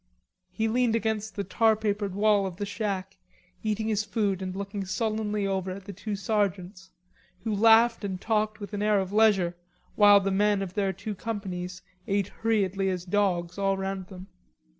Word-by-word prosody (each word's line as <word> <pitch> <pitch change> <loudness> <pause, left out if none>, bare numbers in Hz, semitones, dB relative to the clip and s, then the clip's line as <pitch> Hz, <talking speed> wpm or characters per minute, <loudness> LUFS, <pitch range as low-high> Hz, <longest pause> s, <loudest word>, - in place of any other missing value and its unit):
He 220 - -1
leaned 235 0 +2
against 220 -1 -2
the 200 - -2
tar 220 +4 +3
papered 205 -2 -2
wall 205 -1 +3
of 185 - -7
the 205 - -3
shack, 195 -2 -3 0.4
eating 215 +1 -1
his 215 -1 +1
food 205 -3 -1
and 185 0 -4
looking 200 0 -4
sullenly 210 +1 -1
over 190 -1 -1
at 190 +1 -7
the 200 - -7
two 205 +3 -4
sergeants, 195 -2 -2 0.5
who 220 -2 -1
laughed 225 +2 +5
and 190 -2 -3
talked 215 0 0
with 205 0 -8
an 205 - -2
air 210 -1 +3
of 190 0 -3
leisure 200 -5 +3 0.4
while 205 -1 +7
the 195 0 -1
men 205 0 +2
of 185 -2 -7
their 195 -1 0
two 205 +3 -6
companies 185 -4 -5 0.2
ate 200 -1 0
hurriedly 200 -4 0
as 180 -1 -3
dogs 180 -2 0
all 195 0 +1
round 190 -1 -4
them. 185 -1 -10
200 Hz, 180 wpm, -27 LUFS, 190-215 Hz, 0.5 s, while